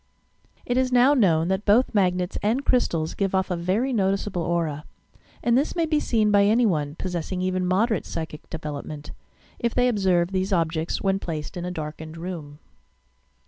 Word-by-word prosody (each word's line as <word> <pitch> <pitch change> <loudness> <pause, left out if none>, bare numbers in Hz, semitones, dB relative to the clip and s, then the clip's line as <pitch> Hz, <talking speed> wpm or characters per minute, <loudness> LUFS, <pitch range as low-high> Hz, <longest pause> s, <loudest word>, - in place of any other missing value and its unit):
It 245 - 0
is 260 0 +1
now 250 +3 +5
known 170 - +3
that 190 +2 0
both 220 +6 +3
magnets 180 -3 +1
and 240 +7 0
crystals 165 -10 +1
give 195 -1 -1
off 190 0 0
a, - - +1
very 195 +10 0
noticeable 195 -3 0
aura, 165 -3 -1 0.6
and 235 0 +3
this 280 +7 +1
may 335 -2 +1
be 305 -1 +1
seen 220 -6 +1
by 200 -1 +5
any 230 +4 +4
one, 150 -7 0
possessing 180 +1 -4
even 185 0 0
moderate 205 +3 +1
psychic 160 -2 -6
development, 150 -1 -6 0.5
if 235 -1 -1
they 250 0 +3
observe 190 -6 +2
these 190 +1 -1
objects 165 -2 0
when 195 0 +1
placed 155 -5 -5
in 175 -1 -4
a - - -3
darkened 155 0 -6
room. 165 -4 -7
185 Hz, 175 wpm, -24 LUFS, 165-220 Hz, 0.6 s, now